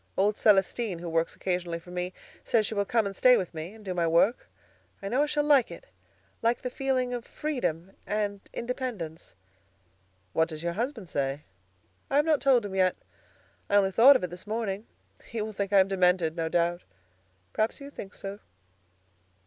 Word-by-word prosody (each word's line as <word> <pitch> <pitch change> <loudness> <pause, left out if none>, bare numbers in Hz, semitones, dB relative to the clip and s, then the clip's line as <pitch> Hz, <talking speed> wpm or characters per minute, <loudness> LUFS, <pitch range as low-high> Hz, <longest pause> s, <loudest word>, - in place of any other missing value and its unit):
Old 205 +2 +3
Celestine, 205 -1 +2
who 170 +1 -7
works 165 0 0
occasionally 180 -2 -2
for 170 +1 -13
me, 180 0 -3 0.3
says 220 -2 +2
she 220 - -3
will 200 -1 0
come 210 -2 +1
stay 250 +5 +6
with 180 - -3
me 165 +6 -6
and 215 -2 -15
do 185 - -2
my 170 -2 +1
work. 170 +8 +2 0.5
I 195 - -5
know 255 +6 +2
I - - +4
shall 295 0 +1
like 285 -5 +4
it, 170 - -10 0.6
like 230 +1 +1
the 250 - -3
feeling 255 -2 0
of 240 -1 -3
freedom 195 - -3 0.2
and 205 -1 -1
independence." 230 - -5 1.0
"What 160 0 +2
does 155 0 -7
your 170 0 -1
husband 230 0 -3
say?" 140 -1 -2 0.7
"I - - -1
have 295 +1 +4
not 310 -3 +2
told 260 -5 +4
him 200 - -6
yet. 185 -1 +2 0.7
I 205 - +2
only 195 -1 +4
thought 255 +8 +8
of 225 - +1
it 180 - -3
this 180 +3 -8
morning. 215 -1 -3 0.4
He 230 - -5
will 215 0 -5
think 200 -1 -3
I 200 - +6
am 190 - +5
demented, 180 -4 +2
no 165 -1 -1
doubt. 175 +1 +1 0.7
Perhaps 220 +1 0
you 280 0 -9
think 195 -8 -9
so." 200 +1 -7
200 Hz, 190 wpm, -28 LUFS, 175-235 Hz, 1.0 s, thought